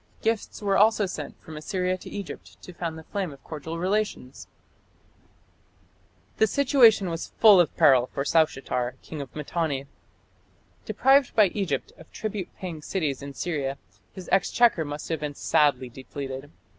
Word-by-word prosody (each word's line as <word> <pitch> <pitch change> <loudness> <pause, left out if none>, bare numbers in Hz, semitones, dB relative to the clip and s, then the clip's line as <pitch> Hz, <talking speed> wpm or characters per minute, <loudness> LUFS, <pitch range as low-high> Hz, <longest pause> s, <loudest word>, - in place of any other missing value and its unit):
Gifts 220 -1 -2
were 195 -1 +2
also 215 0 +4
sent 155 -6 -7
from 160 - -10
Assyria 180 +4 -1
to 185 - -10
Egypt 200 -3 -8
to 180 - -10
fan 165 -2 -4
the 160 - -10
flame 190 -1 -4
of 140 - -14
cordial 160 +1 -6
relations. 185 -7 -2 1.9
The 220 - +4
situation 245 -6 +4
was 165 - -6
full 210 -4 +8
of 170 - -2
peril 130 -3 +5
for 140 - -3
Saushatar, 135 -6 +1
king 155 -2 -7
of 135 - -10
Mitanni. 150 -2 -2 1.0
Deprived 270 0 +3
by 210 -4 +6
Egypt 175 -9 -3
of 160 - -15
tribute 205 -4 -4
paying 170 -5 -6
cities 150 -5 -2
in 140 0 -8
Syria, 140 -2 -2 0.3
his 185 - -10
exchequer 195 0 +3
must 145 0 -6
have 160 -2 -1
been 150 -1 -4
sadly 140 -4 +2
depleted. 135 +2 -7
165 Hz, 150 wpm, -26 LUFS, 140-200 Hz, 1.9 s, full